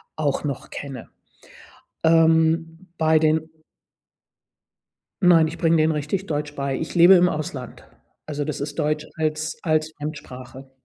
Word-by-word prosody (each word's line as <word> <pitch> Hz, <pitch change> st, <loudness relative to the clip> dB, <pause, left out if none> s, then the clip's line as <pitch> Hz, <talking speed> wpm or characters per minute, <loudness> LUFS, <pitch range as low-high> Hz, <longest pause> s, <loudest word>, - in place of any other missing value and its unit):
auch 150 Hz, -1 st, -1 dB
noch 140 Hz, -3 st, -5 dB
kenne. 135 Hz, -5 st, -8 dB, 0.9 s
Ähm, 165 Hz, +1 st, +2 dB
bei 160 Hz, 0 st, +3 dB
den 155 Hz, 0 st, +1 dB, 1.7 s
Nein, 170 Hz, -3 st, +5 dB
ich 165 Hz, +2 st, -8 dB
bringe 165 Hz, -1 st, +3 dB
denen 155 Hz, +1 st, +3 dB
richtig 150 Hz, +6 st, -3 dB
Deutsch 150 Hz, -2 st, -3 dB
bei. 140 Hz, -1 st, -2 dB
Ich 160 Hz, -, -5 dB
lebe 175 Hz, +2 st, +8 dB
im 180 Hz, -1 st, +5 dB
Ausland. 150 Hz, -6 st, -6 dB, 0.4 s
Also, 150 Hz, -1 st, -3 dB
das 150 Hz, -1 st, -4 dB
ist 145 Hz, 0 st, -5 dB
Deutsch 150 Hz, 0 st, 0 dB
als 155 Hz, 0 st, -2 dB
als 155 Hz, -1 st, 0 dB
Fremdsprache. 135 Hz, -3 st, -8 dB
155 Hz, 135 wpm, -23 LUFS, 145-165 Hz, 1.7 s, lebe